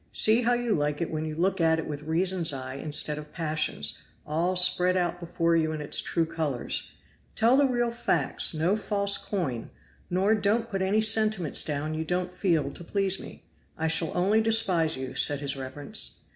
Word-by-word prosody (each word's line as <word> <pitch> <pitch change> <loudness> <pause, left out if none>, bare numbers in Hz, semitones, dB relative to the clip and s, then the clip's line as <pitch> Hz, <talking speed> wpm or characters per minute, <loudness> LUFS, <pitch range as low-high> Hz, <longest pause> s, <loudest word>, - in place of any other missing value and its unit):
See 220 +3 +4
how 245 +1 +2
you 240 -2 0
like 150 -3 -1
it 170 - -3
when 155 0 -3
you 155 -1 -5
look 185 +2 0
at 160 0 +3
it 160 - -4
with 145 -1 -5
reason's 170 +2 +1
eye 130 -1 -5
instead 150 +1 0
of 150 0 -11
passion's, 155 - -1 0.3
all 170 +5 -1
spread 180 0 +4
out 175 -1 -1
before 170 -1 0
you 160 -1 +1
in 155 - -5
its 150 0 +2
true 165 - -1
colors. 155 -6 -3 0.5
Tell 230 +3 +4
the 280 0 +4
real 240 -2 0
facts 170 - +1
no 165 +6 +1
false 200 -1 0
coin, 140 - -4 0.4
nor 190 +4 +2
don't 220 +2 0
put 195 -1 -2
any 200 +3 +2
sentiments 215 -6 +2
down 150 +1 -3
you 160 +1 -3
don't 180 +2 -2
feel 165 -7 0
to 175 - -11
please 195 +1 0
me - - -11 0.3
I 160 - -1
shall 165 0 +1
only 200 +5 +3
despise 190 -9 +2
you,' 130 0 -6
said 145 -1 +2
his 140 -1 -3
reverence. 135 +2 -4
170 Hz, 190 wpm, -27 LUFS, 155-200 Hz, 0.5 s, See